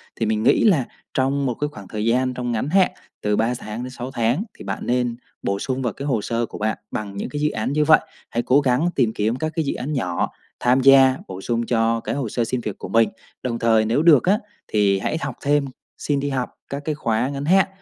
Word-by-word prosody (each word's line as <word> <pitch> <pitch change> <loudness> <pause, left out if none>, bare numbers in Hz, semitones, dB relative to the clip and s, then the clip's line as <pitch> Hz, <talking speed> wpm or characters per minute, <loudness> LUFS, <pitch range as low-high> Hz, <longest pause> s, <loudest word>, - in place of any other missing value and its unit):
Thì 115 - -1
mình 110 0 0
nghĩ - - +4
là 170 - +4 0.3
trong 135 +1 +1
một 125 - 0
cái 150 +5 -2
khoảng 100 -9 -11
thời 105 +1 -3
gian 125 +2 +2
trong 125 -1 -3
ngắn 120 +5 -1
hạn 190 +2 +4 0.3
từ 105 0 +1
3 115 +3 +1
tháng 105 +3 -6
đến 130 - -5
6 125 0 -7
tháng 120 - +1
thì - - -10
bạn - - -4
nên 125 -1 0 0.3
bổ 100 0 -1
sung 130 +3 -2
vào 120 -5 -1
cái 140 - -6
hồ 125 -7 0
sơ 115 +2 -1
của - - -9
bạn 110 +1 -1
bằng 100 -2 -5
những - - -3
cái 145 - -4
dự 150 - +3
án 110 +4 -2
như 150 +1 +3
vậy. 155 0 +7 0.3
Hãy 120 - -1
cố 135 +3 +4
gắng 135 +5 +2
tìm 120 -5 +2
kiếm 110 +3 0
các 155 +5 -2
cái 160 - 0
dự - - 0
án 145 +5 -4
nhỏ, 90 -11 -1 0.3
tham 125 +2 +3
gia, 135 0 +7
bổ 95 0 -7
sung 115 +2 -1
cho 115 -1 +1
cái - - -3
hồ 135 -5 -2
sơ 120 - 0
xin 125 +2 -2
việc 105 -4 -5
của - - -7
mình. 115 0 +4 0.3
Đồng 115 -2 -2
thời, 110 -1 +3
nếu 115 +6 +2
được 160 -6 +7
á 200 +4 +3 0.3
thì 100 -2 +2
hãy 155 - -1
học 140 -3 -3
thêm, 145 0 +2 0.3
xin 145 -2 -1
đi 145 +1 -2
học 130 -2 -2 0.2
các 140 +1 -4
cái 155 - -1
khóa 115 -2 0
ngắn 140 0 -4
hạn 190 +4 +4
125 Hz, 255 wpm, -22 LUFS, 115-140 Hz, 0.3 s, vậy